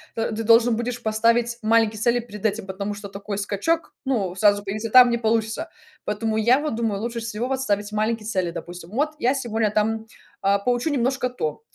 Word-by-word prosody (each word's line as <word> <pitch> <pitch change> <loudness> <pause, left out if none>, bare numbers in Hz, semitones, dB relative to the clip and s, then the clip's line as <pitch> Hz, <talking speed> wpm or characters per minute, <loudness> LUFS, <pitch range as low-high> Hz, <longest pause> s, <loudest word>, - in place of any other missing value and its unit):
то 225 0 -1
ты 225 +1 -3
должен 230 +1 +5
будешь 240 0 -4
поставить 230 +2 +2
маленькие 220 -1 +3
цели 240 +2 +2
перед 210 -3 -9
этим, 210 -1 0
потому 200 +2 -4
что 200 -1 -8
такой 200 0 -6
скачок, 205 +12 -1
ну, 200 -9 -1
сразу 205 +1 +3
перейти, 215 +3 -3
там 250 +1 +8
не 235 - +1
получится. 225 +7 0 0.4
Поэтому 220 +1 -1
я 240 +5 +4
вот 300 -6 -2
думаю, 220 -3 -1
лучше 235 0 -3
всего 225 +2 -3
вот 265 -1 -1
ставить 205 -3 -1
маленькие 215 0 -1
цели: 185 -5 -1
допустим, 175 +1 -8
вот 295 +6 0
я 255 +3 +2
сегодня 225 -4 0
там, 220 +1 0 0.4
а, 200 +1 +3
поучу 245 +7 0
немножко 255 -1 0
то, 455 - -4
225 Hz, 195 wpm, -23 LUFS, 210-240 Hz, 0.4 s, там